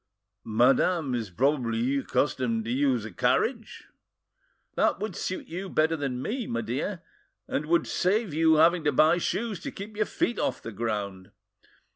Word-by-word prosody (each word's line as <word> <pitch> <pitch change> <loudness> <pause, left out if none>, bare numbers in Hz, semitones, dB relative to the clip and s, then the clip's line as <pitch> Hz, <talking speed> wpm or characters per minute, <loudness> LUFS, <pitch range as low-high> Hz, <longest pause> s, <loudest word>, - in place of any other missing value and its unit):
Madame 130 +6 +2
is 115 -4 -2
probably 125 - +1
accustomed 125 -4 0
to 115 - -3
use 130 -4 +1
a 110 - -7
carriage." - - 0 0.9
"That - - +1
would 215 +2 -4
suit 185 - -4
you 185 +3 -6
better 160 0 +2
than 135 -4 -3
me, 240 0 -3
my 115 0 -2
dear, 140 - -3 0.4
and 150 - -2
would 170 +1 +3
save 200 -1 0
your 160 0 +4
having 165 +1 +4
to 150 - +4
buy 155 +5 +4
shoes 215 +2 -2
to - - -5
keep 205 +2 -9
your 215 0 0
feet 330 -8 -1
off - - -1
the 115 - -8
ground!" 100 -4 -4
145 Hz, 160 wpm, -27 LUFS, 115-175 Hz, 0.9 s, your